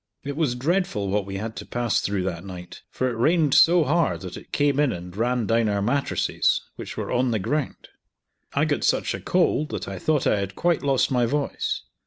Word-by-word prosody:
It 140 0 -4
was 150 -6 0
dreadful 140 - 0
what 100 0 0
we 95 0 -4
had 110 +2 -5
to - - -5
pass 120 -2 0
through 100 -2 -1
that 90 -2 -3
night, 90 -2 -9
for 130 - -1
it 125 - -2
rained 150 +4 +2
so 170 0 +6
hard 165 +2 +1
that 90 -2 -7
it - - -12
came 145 -1 +2
in 145 -3 +3
and 90 +1 -7
ran 120 +2 0
down 115 0 +2
our 100 -1 0
mattresses, 130 +7 +1 0.2
which - - -8
were - - -3
on 125 +1 +2
the 115 - +1
ground. 125 +8 -3 0.7
I - - +2
got - - -1
such - - +1
a - - -5
cold 170 -4 +1
that - - -5
I - - -5
thought 155 -3 +1
I 105 - +2
had 95 0 -4
quite 175 -1 +1
lost 135 -2 +1
my 125 -2 +2
voice. 145 +3 -2
125 Hz, 220 wpm, -24 LUFS, 100-150 Hz, 0.7 s, so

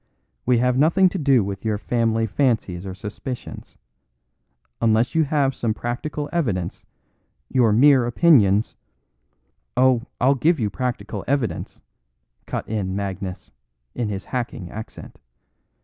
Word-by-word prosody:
"We 125 -1 +4
have 125 +2 +2
nothing 180 +5 +4
to 190 - -4
do 135 -6 +4
with 100 0 -5
your 110 -2 0
family 115 0 0
fancies 105 -6 0
or 95 - -6
suspicions. 105 +6 -8 1.0
Unless 115 +1 +2
you 160 -1 +3
have 140 -2 +1
some 110 -4 -2
practical 145 +6 -4
evidence, 105 - -2 0.7
your 120 -4 +3
mere 130 +2 +5
opinions 115 - +4 0.5
" - - -48
"Oh! 130 -2 +4 0.2
I'll 135 +2 +4
give 155 +4 +2
you 105 -3 -1
practical 110 -4 -4
evidence," 135 -4 -2 0.7
cut - - -4
in 100 -4 -2
Magnus, 95 -2 -5 0.4
in 120 -3 -2
his 100 -2 -5
hacking 115 -8 -4
accent. 110 +1 -9
115 Hz, 130 wpm, -22 LUFS, 100-135 Hz, 1.0 s, mere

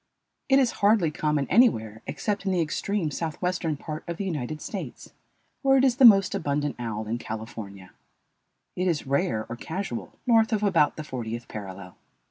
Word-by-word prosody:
It 270 - +6
is 260 -4 +3
hardly 200 -6 +4
common 150 -2 0
anywhere 110 - +3
except 205 -2 -2
in - - +2
the 185 - +1
extreme 165 +2 -1
southwestern 165 0 -2
part 155 +1 -6
of 170 - -3
the 200 - -3
United 155 -4 -3
States, - - -7 0.5
where 270 -1 +4
it 260 - +4
is 250 -2 +2
the 270 - +7
most 195 -4 +7
abundant 145 -6 -1
owl 110 -2 -4
in 115 +3 -3
California. 110 -4 -7 0.8
It 185 +1 0
is 165 -5 0
rare 125 -5 0
or 120 - -5
casual 190 - -5
north 225 -1 +4
of 210 -1 0
about 165 -8 +3
the 155 - -6
fortieth 120 -4 -5
parallel. 95 -3 -8
155 Hz, 170 wpm, -26 LUFS, -, 0.8 s, the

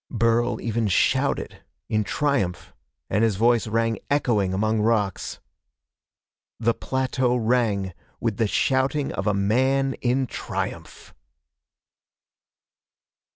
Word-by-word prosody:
Burl 115 +1 +1
even 115 -1 -1
shouted, 95 - +1 0.3
in 110 0 +1
triumph, 120 -6 -1 0.3
and 105 - +1
his 110 -3 +2
voice 115 +2 +3
rang 115 +1 0
echoing 120 -9 +1
among 110 +3 +1
rocks. 105 -3 0 1.2
The 115 0 +2
plateau 130 -1 0
rang 110 -6 +1 0.3
with 115 -3 -1
the 115 - +2
shouting 135 +5 +1
of - - -3
a 105 - +2
man 130 +7 +2
in 130 +2 +1
triumph! - - -6
115 Hz, 105 wpm, -24 LUFS, 105-130 Hz, 1.2 s, voice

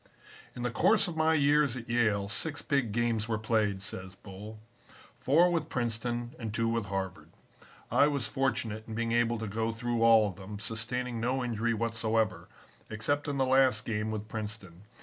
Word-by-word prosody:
"In 120 - -5
the 125 - 0
course 215 - +3
of 170 - -5
my 160 0 +3
years 145 -3 +3
at 120 0 -8
Yale, 105 -4 +1
six 145 +9 -2
big 140 -6 0
games 115 -1 0
were 110 -2 0
played," 105 -3 0
says 95 -2 -6
Bull, 105 +3 -10 0.6
"four 170 +6 +4
with 170 -2 -1
Princeton 120 0 -2
and 110 -3 -4
two 115 +1 0
with 115 -2 -1
Harvard. 95 -1 -4 0.6
I 145 - +5
was 140 -5 -1
fortunate 110 -3 -1
in 110 - -6
being 115 0 -1
able 120 0 +2
to 110 - -4
go 110 +2 -1
through 120 +1 -2
all 115 -2 +6
of 95 - -7
them, 100 +2 -8
sustaining 115 +3 -3
no 125 +3 0
injury 115 -1 0
whatsoever, 115 -2 0 0.4
except 145 +8 -1
in 145 -1 -2
the 135 - +2
last 130 -3 +3
game 105 -1 -2
with 110 -1 -4
Princeton. 105 -5 -7
115 Hz, 180 wpm, -30 LUFS, 110-125 Hz, 0.6 s, all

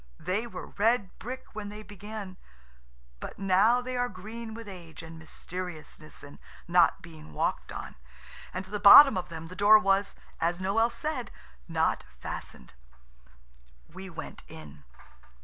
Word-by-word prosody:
They 210 +6 -2
were - - -7
red 220 -2 +2
brick 260 +2 -8
when 210 -1 -6
they 210 +1 -9
began, 205 -2 -8 0.8
but - - -8
now 200 +6 +4
they 255 0 -5
are 245 0 0
green 220 +3 -8
with 230 -1 -9
age 170 -5 -10
and 165 0 -10
mysteriousness 160 -1 -8
and 145 0 -12 0.3
not 175 -1 +4
being 160 -2 -12
walked - - -2
on. - - -7 0.6
And 185 +1 -5
at 190 - -16
the 210 - -2
bottom 265 +7 +10
of 180 -1 -3
them 165 -1 -7
the 180 +3 -10
door 205 +3 +7
was, 195 -1 +1 0.2
as 170 +2 0
Noël 220 +5 +2
said, 300 -4 -4 0.4
not - - 0 0.2
fastened. - - -7 1.2
We 190 +1 -8
went 170 - -8
in. 75 -3 -12
195 Hz, 150 wpm, -29 LUFS, 175-220 Hz, 1.2 s, bottom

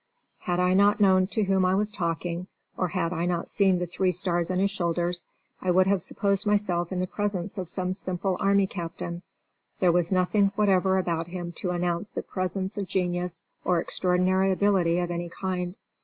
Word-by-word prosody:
Had 175 0 -1
I 180 0 +3
not 205 +2 +4
known 190 -2 +4
to 215 +2 -1
whom 190 -1 +2
I 185 +1 +3
was 210 +2 0
talking, 170 -1 -3 0.3
or 185 - 0
had 170 0 -1
I 170 +1 -1
not 175 -1 -2
seen 195 -3 +3
the 180 - -1
three 185 +2 0
stars 175 -1 0
on 185 - 0
his 195 +1 +2
shoulders, 175 -1 -1 0.3
I 185 - -2
would 185 +1 +5
have 195 -1 +2
supposed 200 +4 0
myself 185 -4 +1
in 185 - -2
the 185 - +1
presence 200 0 -3
of 180 -3 -4
some 185 -1 -1
simple 185 0 -2
army 200 0 +3
captain. 170 -1 -5 0.6
There 180 -2 +4
was 175 0 +1
nothing 195 +2 +2
whatever 190 -2 +3
about 170 -3 -1
him 175 -1 -5
to 180 - -2
announce 175 +2 -1
the - - -5
presence 190 +2 -3
of 195 - -3
genius 180 -2 -1 0.2
or 180 -2 +2
extraordinary 185 +2 +1
ability 185 -3 +2
of 175 -1 -1
any 175 0 -3
kind. 180 +1 -3
185 Hz, 190 wpm, -26 LUFS, 175-195 Hz, 0.6 s, would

